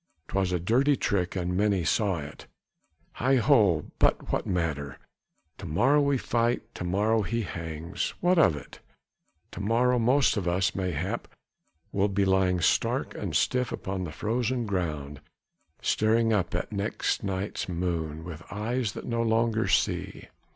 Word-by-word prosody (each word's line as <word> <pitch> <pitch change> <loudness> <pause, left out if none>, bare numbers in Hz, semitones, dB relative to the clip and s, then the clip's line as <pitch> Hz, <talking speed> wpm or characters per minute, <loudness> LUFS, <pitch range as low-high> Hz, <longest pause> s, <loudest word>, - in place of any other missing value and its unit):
'Twas 95 -2 0
a 90 - 0
dirty 130 - +3
trick 95 -8 -1
and 90 -1 -1
many 100 -2 +2
saw 100 +1 +1
it. 75 0 -9 0.7
Heigh 130 +3 +3
ho, 110 - +3
but - - +2
what - - -1
matter! 75 -7 -2 0.6
To - - -7
morrow 120 - +3
we 140 -1 +2
fight, 120 -1 -1
to - - -6
morrow 105 +5 +2
he 115 +4 -1
hangs! 85 -1 -4
What 180 0 +3
of 150 - +5
that? 70 - -10 0.7
To - - -7
morrow 120 +4 +2
most 125 +2 +3
of 95 -3 -2
us 95 +2 +1
mayhap 95 +3 -2 0.6
will 100 +1 +2
be 100 0 +1
lying 95 -2 +2
stark - - +1
and - - -4
stiff 125 -2 +1
upon 95 -1 -4
the 80 - -6
frozen 120 +4 -1
ground, 75 -8 -3 0.6
staring 115 +1 +2
up 90 -5 0
at 90 - -3
next 100 +1 -1
night's 95 0 -3
moon, 85 -3 -2
with 85 -2 -8
eyes 110 +2 -2
that - - -7
no 115 -1 -1
longer 115 -2 +1
see! 95 - 0
100 Hz, 150 wpm, -27 LUFS, 90-115 Hz, 0.7 s, of